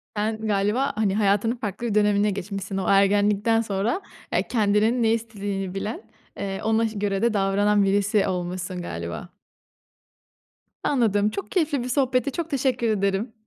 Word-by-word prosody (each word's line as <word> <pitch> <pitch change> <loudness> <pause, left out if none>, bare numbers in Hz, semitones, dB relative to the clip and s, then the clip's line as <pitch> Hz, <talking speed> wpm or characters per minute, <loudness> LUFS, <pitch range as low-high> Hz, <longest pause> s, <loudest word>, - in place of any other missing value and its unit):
Sen 215 +1 -2
galiba, 210 +6 +1
hani, 205 -3 +1
hayatının 210 +3 +2
farklı 225 0 -4
bir 210 - -2
dönemine 210 0 +3
geçmişsin. 195 0 -5
O 190 - -2
ergenlikten 205 +3 +3
sonra, 215 - -1 0.3
eee, - - +1
kendinin 220 +2 +2
ne 225 - +3
istediğini 200 -4 -4
bilen, 210 +3 -4 0.4
eee, 195 -1 -4
ona 225 +1 +2
ş 215 -2 -6
göre 195 -1 -1
de 235 -1 +2
davranan 200 +1 +2
birisi 200 +1 +2
olmuşsun 180 0 -3
galiba. 85 - -6 1.5
Anladım. 215 -6 +2
Çok 395 - -6
keyifli 300 -8 +1
bir 250 - -5
sohbetti. 260 +1 +1
Çok 335 +2 -4
teşekkür 255 -4 0
ederim. 200 +2 0
210 Hz, 145 wpm, -24 LUFS, 195-230 Hz, 1.5 s, dönemine